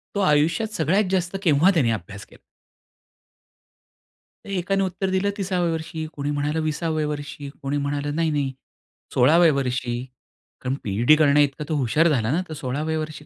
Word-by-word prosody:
तो - - 0
आयुष्यात 170 +6 +2
सगळ्यात 170 +7 +2
जास्त 180 0 0
केव्हा 160 +3 +4
त्यांनी 135 -10 +2
अभ्यास 100 -1 -6
केला? - - -19 2.1
एकाने 195 +1 0
उत्तर 190 +1 -2
दिलं 190 +2 +1
30व्या 180 -3 0
वर्षी, 160 0 -4
कोणी 145 0 -3
म्हणालं 145 +2 -1
20व्या 155 0 -1
वर्षी, 145 -1 -6
कोणी 140 +1 -2
म्हणालं 145 +1 -2
नाही, 165 0 +1
नाही, 140 -3 -1 0.6
16व्या 160 +5 +5
वर्षी 125 -3 -1 0.7
कारण 130 +1 -1
पी-एच-डी 115 +9 +4
करण्याइतका 145 -1 +3
तो 155 - 0
हुशार 145 +5 +2
झाला 120 -5 +1
ना, 165 +5 +1
तर - - -5
16व्या 150 +3 -2
वर्षी, 155 -1 -6
150 Hz, 150 wpm, -23 LUFS, 140-170 Hz, 2.1 s, 16व्या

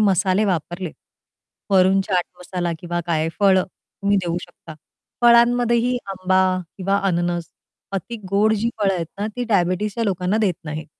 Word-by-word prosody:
मसाले 195 0 +3
वापरले. 175 -1 -2 0.8
वरून 190 0 +4
चाट 185 -2 0
मसाला 180 -1 -3
किंवा 175 +1 -3
काय 160 -2 0
फळ 195 -2 +5
तुम्ही 200 +2 -3
देऊ 170 0 -1
शकता. 170 -2 -12 0.5
फळांमध्येही 240 +1 +4
आंबा 185 -1 +1 0.4
किंवा 195 +1 0
अननस 175 -1 -1 0.4
अति 195 +5 -4
गोड 210 +2 +3
जी 225 +2 0
फळं 195 -2 +2
आहेत 170 -2 -3
ना, 205 - -1
ती 245 - -1
डायबिटीजच्या 205 +1 0
लोकांना 185 0 0
देत 195 -5 +2
नाहीत. 155 0 -5
190 Hz, 140 wpm, -21 LUFS, 175-210 Hz, 0.8 s, फळ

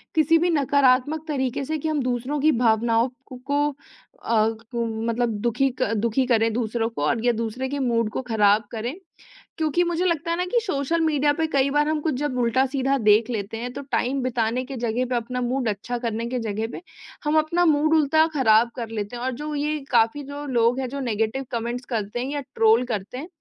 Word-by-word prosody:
किसी 320 +1 +4
भी 350 +2 +1
नकारात्मक 285 0 +2
तरीके 270 -2 -1
से 315 +2 -2
कि 310 +1 -4
हम 300 -2 0
दूसरों 255 +4 -2
की 310 +2 +5
भावनाओं 230 -1 +2 0.2
क 250 - -9
को 290 +1 +1 0.5
अ, 220 -2 +2
को 230 +1 -4 0.2
मतलब 235 +1 0
दुखी 255 +4 +1
क 215 - +1
दुखी 235 +4 +1
करें 225 -2 +3
दूसरों 225 -1 -1
को 230 - -6
और 225 +8 0
या 245 - +5
दूसरे 230 +3 -3
के 285 - -3
मूड 230 -4 +1
को - - -3
ख़राब 210 -2 +3
करें। 235 +3 -3 0.6
क्योंकि 320 +2 +1
मुझे 345 +1 -1
लगता 335 -1 0
है 335 - 0
ना 360 - 0
कि 485 - +4
सोशल 330 -3 -1
मीडिया 295 -2 +2
पे 320 +1 -1
कई 275 0 +3
बार 295 +1 +2
हम 310 -1 0
कुछ 315 -1 0
जब 275 -1 -2
उल्टा-सीधा 265 +3 +1
देख 215 -1 +4
लेते 220 -2 -4
हैं, 245 +2 -5
तो 280 - -6
टाइम 265 +2 0
बिताने 245 0 0
के 270 +1 -7
जगह 235 +1 -1
पे 255 - 0
अपना 245 +2 -2
मूड 250 0 -1
अच्छा 220 +4 -3
करने 230 -1 -3
के 250 +1 -2
जगह 220 -1 -2
पे, - - -7 0.4
हम 300 0 +2
अपना 335 +3 +1
मूड 310 0 +3
उल्टा 315 +1 +4
ख़राब 230 -3 +4
कर 235 -3 -5
लेते 215 0 -4
हैं। 240 - -6
और 260 - 0
जो 300 0 -4
ये 300 +1 -1
काफ़ी 235 +4 +3
जो 285 +1 -7
लोग 245 -1 +2
हैं 260 - -2
जो 280 +2 -5
नेगेटिव 230 +1 -1
कमेंट्स 240 +1 -3
करते 220 -1 -3
हैं 260 +3 -3
या 290 - -2
ट्रोल 225 +2 +4
करते 220 0 -4
हैं 295 +6 -6
250 Hz, 215 wpm, -24 LUFS, 230-290 Hz, 0.6 s, की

